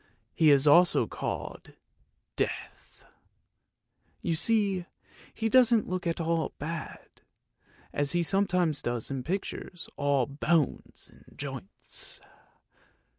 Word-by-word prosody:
He 160 -2 +4
is 140 -1 +5
also 170 +4 +5
called - - -6 0.6
Death; - - -5 1.2
you 170 - 0
see 195 0 +2 0.4
he 225 - -2
doesn't 235 -2 +4
look 180 -1 -3
at 170 - -1
all 165 0 -1
bad, 165 +2 -7 0.7
as 145 -1 +1
he 175 0 +2
sometimes 180 -5 +2
does 120 0 -3
in 135 -2 -3
pictures, 180 +2 -5
all 140 -3 +2
bones 150 +2 -1
and - - -21
joints! 165 - -7
170 Hz, 105 wpm, -28 LUFS, 145-190 Hz, 1.2 s, is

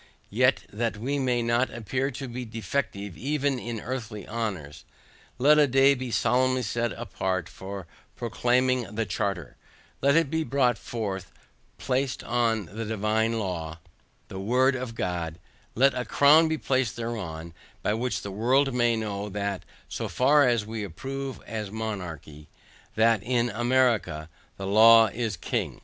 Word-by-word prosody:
Yet 125 0 +3
that 115 +1 -1
we 135 +6 -2
may 125 -3 +1
not 120 +2 +2
appear 130 +4 -2
to 135 0 -6
be 125 +1 -5
defective 110 -4 -3
even 140 -1 -1
in 115 -1 -5
earthly 115 -4 -5
honors, 95 -10 -4 0.5
let 150 +4 +5
a 145 - +5
day 135 +2 +5
be 130 -2 -4
solemnly 125 +3 +2
set 120 +2 -1
apart 95 -5 -3
for 95 -1 -8 0.3
proclaiming 125 -1 0
the 115 0 0
charter; 95 -5 -3 0.4
let 140 +1 +4
it 165 -4 +3
be 160 0 0
brought 130 -5 +1
forth 100 -5 -4 0.5
placed 130 0 -1
on 115 -3 0
the 110 +7 -6
divine 110 +1 0
law, 85 -6 -4 0.5
the 95 - -7
word 125 +7 +3
of 125 -3 -5
God; 85 -5 -3 0.4
let 135 +4 +4
a 125 - -2
crown 145 +7 +5
be 160 0 -1
placed 130 -7 0
thereon, 90 -9 -5 0.3
by 105 - +1
which 120 +3 -2
the 100 - -5
world 130 +7 +2
may 120 -1 +2
know, 105 -2 -3
that 100 -1 -3 0.3
so - - -4
far 140 +2 +4
as 120 -4 +1
we 110 0 -5
approve 135 - -5
as 110 -2 -4
monarchy, 90 -9 -6 0.5
that 115 -1 +4
in 120 0 0
America 115 -9 +1 0.3
THE 95 - -5
LAW 110 +2 +7
IS 110 -5 -2
KING. - - -3
115 Hz, 150 wpm, -26 LUFS, 100-130 Hz, 0.5 s, LAW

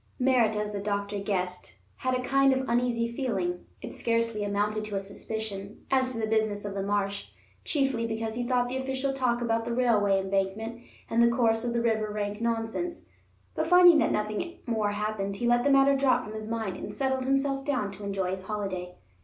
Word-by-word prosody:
Merritt, 250 -4 +3
as 210 0 -2
the 205 - -3
doctor 200 0 -2
guessed, 185 -3 -3 0.2
had 255 0 0
a 250 - -2
kind 275 +1 +4
of 260 0 -1
uneasy 235 -1 +1
feeling—it 200 -8 -4
scarcely 230 -2 0
amounted 205 +1 0
to 210 -1 -5
a - - +1
suspicion—as 220 +5 -3
to - - -5
the 220 - 0
business 215 -2 0
of 200 - -4
the 195 - -2
marsh; 200 0 -1 0.4
chiefly 270 -6 0
because 225 0 -3
he 245 +2 -2
thought 245 0 +1
the 255 +2 -3
official 265 +1 -1
talk 245 -3 0
about 230 -1 +1
the 235 - -4
railway 210 -6 +3
embankment 195 +4 -2 0.3
and 230 +1 +2
the 235 - +7
course 230 -1 +2
of 240 -1 -1
the 235 0 0
river 220 -2 +1
rank 210 0 -3
nonsense. 230 +9 -2 0.4
But - - -1
finding 355 -2 +8
that - - +2
nothing 215 +11 -2
more 220 -3 0
happened, 205 -1 -2
he 240 - -3
let 240 0 +3
the 285 - +3
matter 275 0 +5
drop 270 -1 +3
from 215 - -8
his 215 0 -6
mind, 225 -4 -2
and 205 - -7
settled 265 0 0
himself 275 0 +1
down 255 -8 -1
to 205 - -10
enjoy 195 -2 -1
his 190 0 -5
holiday. 190 -4 -4
225 Hz, 195 wpm, -28 LUFS, 205-255 Hz, 0.4 s, finding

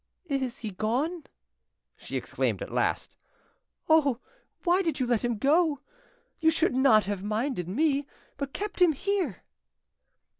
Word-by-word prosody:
"Is 270 -5 -2
he 220 -3 -5
gone?" 260 - -1 0.7
she - - -5
exclaimed - - -2
at - - -9
last. - - -1 0.7
"Oh, 285 -6 +4 0.4
why 360 +1 +3
did 330 -6 -1
you 255 - +1
let 240 -3 +1
him 240 -2 0
go? 295 +3 +2 0.6
You 320 - +4
should 320 -1 +1
not 250 -5 +5
have 200 -1 -3
minded 215 - -2
me, 285 +5 +1 0.3
but 280 -1 -4
kept 415 +2 -5
him 345 -3 +6
here." 370 - -2
275 Hz, 140 wpm, -28 LUFS, 235-320 Hz, 0.7 s, him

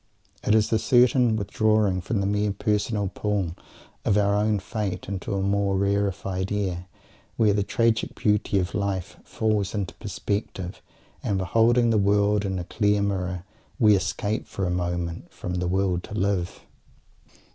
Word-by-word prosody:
It 105 - +3
is 110 0 +2
a 110 - +3
certain 125 -2 +4
withdrawing 105 -2 +1
from 100 +3 -1
the - - 0
mere 105 +1 +1
personal 105 +1 0
pull 100 -5 -1 0.5
of 100 - +2
our 100 -1 +3
own 105 +1 +2
fate 100 0 -4
into 100 0 -3
a 95 - 0
more 100 0 +1
rarified 100 -1 -1
air, 95 -3 -2 0.5
where 110 -3 +4
the 100 - +1
tragic 115 +2 0
beauty 105 -1 +1
of 95 0 -1
life 100 -3 -2
falls 110 -2 -1
into 100 -4 -3
perspective, 100 -3 -4 0.4
and, 100 - -1
beholding 115 +5 +3
the 110 - +3
world 100 +1 +2
in 95 -1 -2
a 90 - -3
clear 105 +2 +1
mirror, 90 -3 -2 0.3
we 110 -6 +6
escape 100 +3 -2
for 95 - -3
a 90 - -1
moment 85 -1 -3
from 90 - -6
"the 90 - -1
will 95 -1 +1
to 100 - -9
live." 95 -4 -1
100 Hz, 155 wpm, -25 LUFS, 95-105 Hz, 0.5 s, we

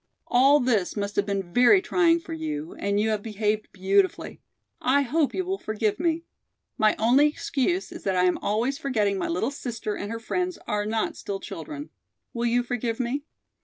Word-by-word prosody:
All 270 +4 +5
this 225 -8 +1
must 200 0 -3
have 205 0 +1
been 195 -3 -3
very 250 +11 +6
trying 340 -3 +3
for 330 0 -8
you, 315 +1 -4
and 200 0 0
you 220 +1 +1
have 215 -1 0
behaved 215 0 -2
beautifully. 190 0 0 0.4
I 280 +3 +3
hope 295 +3 0
you 375 - -1
will 385 +1 -2
forgive 215 +1 -1
me. 335 -1 0 0.5
My 215 -1 +3
only 250 +7 +5
excuse 300 +5 -1
is 340 - -9
that 190 -1 +1
I 180 - +3
am 180 -1 +2
always 235 +7 0
forgetting 210 -8 0
my - - -1
little 180 +10 -1
sister 235 -6 -4
and 205 +1 -5
her 230 - -4
friends 360 +9 -2
are 210 0 -1
not 220 0 -1
still 195 -1 -4
children. 290 - -7 0.4
Will 235 0 -1
you 245 +1 +2
forgive 240 -1 -2
me?" 260 +4 -2
235 Hz, 190 wpm, -26 LUFS, 205-295 Hz, 0.5 s, very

